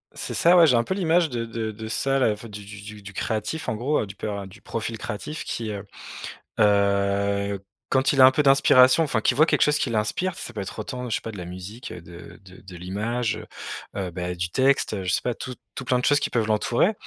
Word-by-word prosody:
C'est - - -4
ça, 175 +2 +5
ouais. 170 - +8
J'ai 135 -6 +4
un 115 - +3
peu 190 - -2
l'image 170 -3 +2
de 120 -3 -3
de 115 -1 -4
de 110 +1 -8
ça, 135 +4 0
là, 130 -5 +3
enfin, 105 +2 -6
du 105 -1 -9
du 100 0 -10
du 105 0 -10
du 100 0 -9
créatif, 110 - -2
en - - -1
gros, 135 +7 0
heu, 105 - -4
du 100 - -10
per 100 -2 -4
du 95 - -15
profil 115 0 -4
créatif 150 +9 -5
qui, 115 -2 -4
heu 100 -2 -5 0.8
heu, 100 0 +2 0.3
quand 130 0 +2
il 140 - 0
a 130 - +10
un 130 - +8
peu 150 - +1
d'inspiration, 135 +1 +6
enfin, 130 -8 0
qu'il 125 - +2
voit 155 - +7
quelque - - +1
chose 150 0 +4
qui 140 - -1
l'inspire, 115 +12 -1
ça - - -6
peut 110 - -7
être 95 - -7
autant, 125 +3 -5
je 110 - +1
sais - - -3
pas, 115 - -6
de 105 - -9
la 90 - -6
musique, 95 +7 -8
de 85 0 -11
de 95 -1 -15
de 95 -1 -12
l'image, 110 +7 -2
heu - - -9 0.6
heu, - - -7
bah, 90 0 -4
du 85 0 -2
texte. 135 +7 +2
Heu, 95 - -4
je 90 - 0
sais - - +2
pas, 125 - 0
tout 125 +2 -7 0.2
tout 130 - -5
plein 125 0 +2
de - - -4
choses 145 0 +4
qui - - -1
peuvent 115 -3 0
l'entourer. 115 - +2
110 Hz, 255 wpm, -24 LUFS, 100-130 Hz, 0.8 s, a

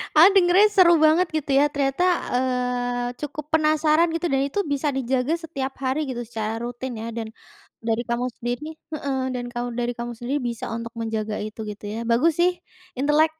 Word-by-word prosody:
aku 325 +5 +9
dengernya 365 +3 +6
seru 370 -4 +6
banget, 315 +4 +5
gitu 290 -2 -1
ya. 290 - +6
Ternyata 275 +4 0 0.3
eee, 250 -1 -1
cukup 300 0 -6
penasaran, 310 +1 +3
gitu 335 +1 -1
dan 270 0 +2
itu 290 +9 -2
bisa 285 0 0
dijaga 265 +3 0
setiap 275 -6 -4
hari, 265 +3 0
gitu, 250 -3 -4
secara 225 -1 -4
rutin 245 +1 -5
ya, 230 - -4
dan 230 -1 -4 0.6
dari 225 +1 0
kamu 240 +1 0
sendiri 245 +6 -3
heeh, 285 -4 -4 0.2
dan 245 - -4
kau 240 0 -3
dari 240 0 -2
kamu 240 0 -5
sendiri 265 +5 -2
bisa 235 -2 -4
untuk 230 0 -5
menjaga 220 -2 -2
itu, 215 +1 -8
gitu 210 0 -8
ya. 225 - -4
Bagus 305 +8 +3
sih, 355 0 +3 0.4
intelek. 300 +4 +3
265 Hz, 180 wpm, -24 LUFS, 240-310 Hz, 0.6 s, aku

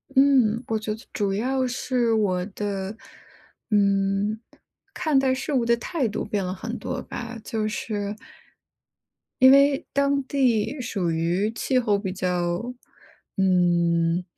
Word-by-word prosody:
嗯， 260 -4 +4
我 220 -1 0
觉 215 0 -3
得 225 - -15
主 200 -2 -1
要 255 +5 0
是 245 -2 0
我 185 -4 +1
的， 200 0 -4 0.7
嗯， 200 +1 +1 0.5
看 310 -6 +2
待 265 -1 +2
事 270 +3 -4
物 245 -3 +2
的 235 0 +4
态 275 -1 -2
度 210 - -3
变 205 -2 -2
了 180 0 -3
很 185 - -5
多 - - -4
吧， 240 -1 -7
就 215 -1 -2
是 210 -1 -3 1.2
因 260 +1 +8
为 280 0 +4
当 280 0 +2
地 260 -1 +1
属 195 -8 -2
于 175 +6 0
气 255 +3 0
候 215 -5 +2
比 190 -2 -4
较， 180 +5 -2 0.6
嗯， 175 -2 +2
215 Hz, 145 characters per minute, -24 LUFS, 195-255 Hz, 1.2 s, 因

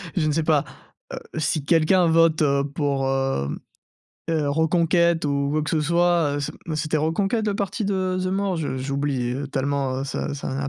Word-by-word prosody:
je 155 -4 +1
ne - - +2
sais 160 +1 0
pas, 155 -3 +2 0.5
heu, - - -4 0.2
si 155 -1 0
quelqu'un 170 +2 +4
vote, 165 -1 +4
heu, 140 -1 +2
pour, 140 -2 -1
hem, 135 - -1 0.7
heu, 155 -3 0
Reconquête 165 +2 +2
ou 140 0 0
quoi 155 0 +1
que 150 - -3
ce 155 - +1
soit, 170 -2 +2
heu, - - -2
ce, 140 - -4
mmh, 160 - -3
c'était 155 +1 -1
Reconquête 195 +8 0
le 200 - -1
parti 200 +1 -2
de 185 -2 -1
Zemmour? 190 0 -1
Je 145 -4 -3
j'ai 135 +2 -4
oublié, 135 -4 -1
heu, 140 0 -4
tellement, 135 -1 -1
heu, - - -3
ça 140 - -3
ça 140 - -5
n'a 135 0 -2
155 Hz, 200 wpm, -23 LUFS, 140-170 Hz, 0.7 s, quelqu'un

